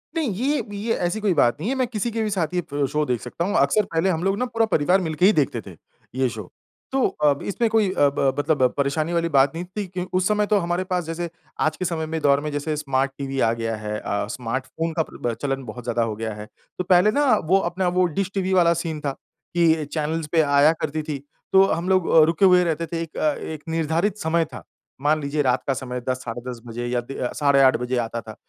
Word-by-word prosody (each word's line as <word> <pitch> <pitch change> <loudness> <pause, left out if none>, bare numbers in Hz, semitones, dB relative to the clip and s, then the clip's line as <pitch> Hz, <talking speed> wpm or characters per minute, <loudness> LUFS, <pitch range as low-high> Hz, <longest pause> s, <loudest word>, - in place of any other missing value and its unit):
नहीं, 310 -7 0
ये 280 +7 0 0.2
ये 225 +3 -1
ऐसी 215 +5 -2
कोई 200 -4 +2
बात 140 -2 +2
नहीं 200 +9 -2
है। 270 - 0
मैं 255 -2 0
किसी 230 0 -2
के 225 0 -1
भी 215 - -1
साथ 180 -3 -1
ये 145 -6 -1
शो 150 0 +1
देख 125 -4 -1
सकता 165 +8 -4
हूँ। 205 +2 -1
अक्सर 215 - +3
पहले 165 +4 +2
हम 165 -1 -1
लोग 195 +1 +1
ना 250 - 0
पूरा 230 -2 +1
परिवार 180 +6 +3
मिलके 160 +1 +1
ही 210 - +6
देखते 130 -6 0
थे, 90 - -10 0.4
ये 130 -1 +1
शो। 110 -5 -8 0.4
तो 270 -1 +2 0.2
अब 140 -1 +3
इसमें 230 +3 0
कोई 220 -3 +2
अ 145 - +3
ब 135 -1 +2
मतलब 145 -2 +1
परेशानी 155 +4 0
वाली 170 0 +1
बात 135 0 +5
नहीं 175 +2 -4
थी 200 +2 -5
कि 180 0 -5
उस 185 0 +2
समय 210 0 +2
तो - - +6
हमारे 175 +1 -1
पास 180 -2 -1
जैसे 165 +1 -4 0.3
आज 155 0 +1
के 185 - -3
समय 160 -2 -2
में, 160 +1 -3
दौर 140 -1 +4
में 150 0 -4
जैसे 145 +2 -2
स्मार्ट 135 -2 0
टीवी 135 -1 -4
आ 115 - +3
गया 115 -1 -2
है 105 0 -4
अ, 100 0 -2
स्मार्ट 125 +2 -3
फ़ोन 165 0 -3
का 160 - +1
प्र 120 -1 -3
चलन 135 -1 -2
बहुत 120 +2 -8
ज़्यादा 120 -1 0
हो 110 -2 -2
गया 110 0 -4
है। 105 0 -8 0.3
तो 180 - -1
पहले 180 +3 +4
ना 290 +6 +2 0.2
वो 190 +3 +5
अपना 185 +1 -1
वो 180 - +5
डिश 195 0 -1
टीवी 190 -1 0
वाला 170 -2 +5
सीन 160 -2 -4
था 140 - -1 0.4
कि 160 -3 +3
चैनलज़ 155 0 -2
पे 165 -2 +4
आया 145 +1 +5
करती 155 +1 -2
थी। 150 -1 -4 0.4
तो 190 0 +8
हम 170 +3 -1
लोग 185 -2 +2
अ, 160 -1 +7
रुके 165 +4 +2
हुए 180 -1 +6
रहते 165 0 -1
थे 165 0 -3
अ, - - -4
एक 155 -1 -1
एक 155 - -9
निर्धारित 165 +5 0
समय 165 -2 +1
था। 110 -10 -8 0.4
मान 155 +1 +2
लीजिए 145 +1 -1
रात 130 -2 +1
का 135 - +2
समय 125 -1 -5
10 130 - +1
साढ़े 120 0 -5
10 120 -2 -6
बजे 120 +1 -5
या 120 0 0
दी 135 +3 -9 0.2
साढ़े 140 -2 +4
8 130 -1 +5
बजे 125 +1 -2
आता 115 0 -2
था। 110 -1 -10
160 Hz, 255 wpm, -23 LUFS, 135-180 Hz, 0.4 s, तो